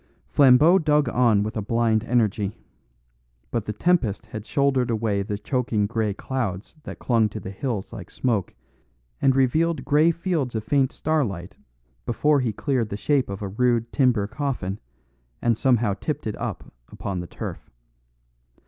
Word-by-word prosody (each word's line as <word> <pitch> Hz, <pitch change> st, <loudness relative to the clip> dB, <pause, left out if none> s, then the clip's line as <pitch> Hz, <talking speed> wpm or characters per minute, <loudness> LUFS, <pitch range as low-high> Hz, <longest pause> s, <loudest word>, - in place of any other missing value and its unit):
Flambeau 145 Hz, +7 st, +6 dB
dug 150 Hz, -4 st, +2 dB
on 115 Hz, -4 st, +3 dB
with 110 Hz, -, -4 dB
a 110 Hz, -, -1 dB
blind 115 Hz, +1 st, +1 dB
energy. 110 Hz, -4 st, 0 dB, 0.9 s
But 115 Hz, -3 st, -1 dB
the -, -, -3 dB
tempest 115 Hz, -, +1 dB
had 110 Hz, -1 st, -8 dB
shouldered 135 Hz, -3 st, +1 dB
away 110 Hz, -3 st, 0 dB
the 100 Hz, +1 st, -3 dB
choking 115 Hz, -3 st, 0 dB
grey 110 Hz, 0 st, -1 dB
clouds 100 Hz, -, -4 dB
that -, -, -7 dB
clung 115 Hz, -3 st, +2 dB
to -, -, -6 dB
the 95 Hz, -, -7 dB
hills 105 Hz, -1 st, -4 dB
like 95 Hz, -4 st, -8 dB
smoke 110 Hz, -8 st, -1 dB, 0.7 s
and 135 Hz, -1 st, +4 dB
revealed 155 Hz, +6 st, +2 dB
grey 150 Hz, +3 st, +4 dB
fields 170 Hz, -7 st, -1 dB
of 110 Hz, -, -2 dB
faint 130 Hz, +4 st, +2 dB
starlight 110 Hz, -, -2 dB, 0.5 s
before 145 Hz, +5 st, +2 dB
he 125 Hz, -4 st, 0 dB
cleared 120 Hz, 0 st, -1 dB
the 100 Hz, -, -4 dB
shape 135 Hz, +1 st, +1 dB
of 100 Hz, +1 st, -5 dB
a -, -, -2 dB
rude 120 Hz, +2 st, +1 dB
timber 125 Hz, -7 st, +3 dB
coffin, 115 Hz, -6 st, -3 dB, 0.6 s
and 120 Hz, -1 st, +2 dB
somehow 120 Hz, -3 st, +2 dB
tipped 95 Hz, -, -4 dB
it -, -, -2 dB
up -, -, -6 dB, 0.2 s
upon 95 Hz, -2 st, -4 dB
the 90 Hz, -, -6 dB
turf. -, -, -7 dB
115 Hz, 155 wpm, -24 LUFS, 105-135 Hz, 0.9 s, Flambeau